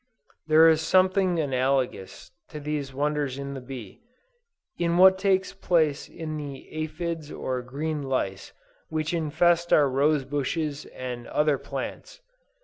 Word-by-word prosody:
There 160 +1 +7
is 160 -1 +4
something 185 +1 +3
analogous 130 -7 -1 0.2
to 150 - -7
these 145 -2 -3
wonders 145 -1 -1
in 140 0 -5
the 135 - -6
bee, 125 -6 -9 0.8
in 170 0 +1
what 190 +1 +7
takes 190 -1 +1
place 155 -5 +1
in 155 -2 -6
the 140 -3 -7 0.2
aphides 165 -1 -4
or 130 -1 -3
green 145 +5 -3
lice 115 -8 -2 0.4
which 155 +1 -2
infest 170 +2 +2
our 145 -2 +6
rose 140 +1 +2
bushes 145 +1 -2
and 125 -2 -7
other 150 -2 +1
plants. - - -6
150 Hz, 135 wpm, -26 LUFS, 135-165 Hz, 0.8 s, There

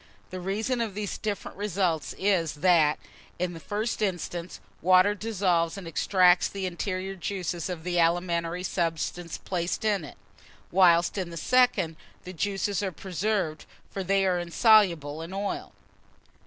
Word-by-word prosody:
The 185 - -5
reason 215 +7 -1
of 215 -4 -3
these 210 -1 -4
different 210 -3 -4
results 185 -6 -1
is, 185 -6 +1
that, 155 -2 +4 0.4
in 175 0 -2
the 165 - -8
first 215 +6 -3
instance, 175 -3 -3 0.2
water 185 +3 +5
dissolves 185 -5 0
and 190 -4 -7
extracts 180 +1 +4
the 195 -1 -5
interior 185 +1 -3
juices 180 -2 -3
of 175 -3 -5
the 175 0 0
alimentary 170 +1 +1
substances 170 -1 -2
placed 180 +3 -3
in 205 -5 +1
it; 150 - -10 0.5
whilst, 175 0 +4
in 180 -2 -3
the 170 - -8
second, 200 -6 +2 0.3
the 185 - -8
juices 200 +2 -1
are 195 -2 -2
preserved; 185 -2 -2 0.2
for 195 - -4
they 195 +1 +2
are 180 -2 +2
insoluble 170 -5 +3
in 165 +3 -7
oil. 200 +1 -3
185 Hz, 145 wpm, -27 LUFS, 170-200 Hz, 0.5 s, water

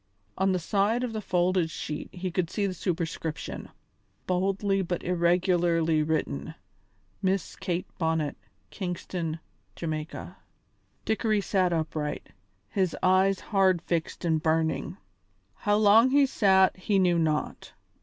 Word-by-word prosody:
On 190 +1 +2
the 185 - +1
side 205 +7 +1
of 240 -3 -3
the 215 - -3
folded 180 -2 +1
sheet 150 -1 -5
he 185 0 -4
could 175 -1 -1
see 205 - -1
the 190 - -1
superscription, 165 -3 -4 0.6
boldly 195 +2 +1
but 175 -1 -3
irregularly 170 -2 +2
written: 150 - -2 0.7
"Miss 190 -2 -1
Kate 180 -1 -2
Bonnet, 160 -3 0 0.4
Kingston, 175 -3 -4 0.4
Ja." 155 -2 -4 0.8
Dickory 220 -1 +1
sat 185 -2 +1
upright, 155 -2 -3 0.4
his 190 -4 0
eyes 190 +1 +4
hard 190 -4 +2
fixed 170 +1 -3
and 160 -2 +1
burning. 160 - 0 0.6
How 205 - 0
long 215 +4 +6
he 280 +1 +5
sat 190 -7 +4
he 195 +2 0
knew 180 -3 +3
not. 155 -2 -2
180 Hz, 125 wpm, -27 LUFS, 165-195 Hz, 0.8 s, long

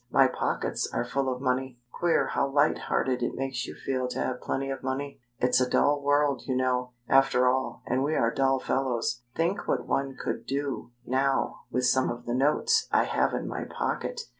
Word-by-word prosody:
My - - +5
pockets - - -2
are - - -1
full 135 +1 -1
of 125 +1 -5
money. 130 -1 -1
Queer 170 +4 +1
how 140 - +1
light 145 +2 +3
hearted 125 -2 0
it 120 - -1
makes 135 -2 -3
you - - -8
feel 130 -1 -2
to 125 - -5
have 125 -1 -2
plenty 135 0 -2
of 135 - -5
money. 135 +1 -4 0.2
It's 125 0 +3
a 125 - +1
dull 145 0 +3
world, 145 -1 +2
you 130 - 0
know, 125 -1 0
after 135 -2 +4
all, 130 +1 0
and 130 +2 0
we 155 +2 0
are 115 0 +2
dull 135 0 +2
fellows. 125 -3 -1
Think 170 +4 0
what - - 0
one 135 -1 -1
could - - -4
do, 140 -2 -3 0.2
now, 135 +2 0
with 125 0 0
some 130 +1 +3
of 120 0 -5
the 120 - -2
notes 150 - +2
I - - +4
have - - +1
in - - -3
my - - -4
pocket! 485 -2 -3
130 Hz, 200 wpm, -28 LUFS, 125-140 Hz, 0.2 s, My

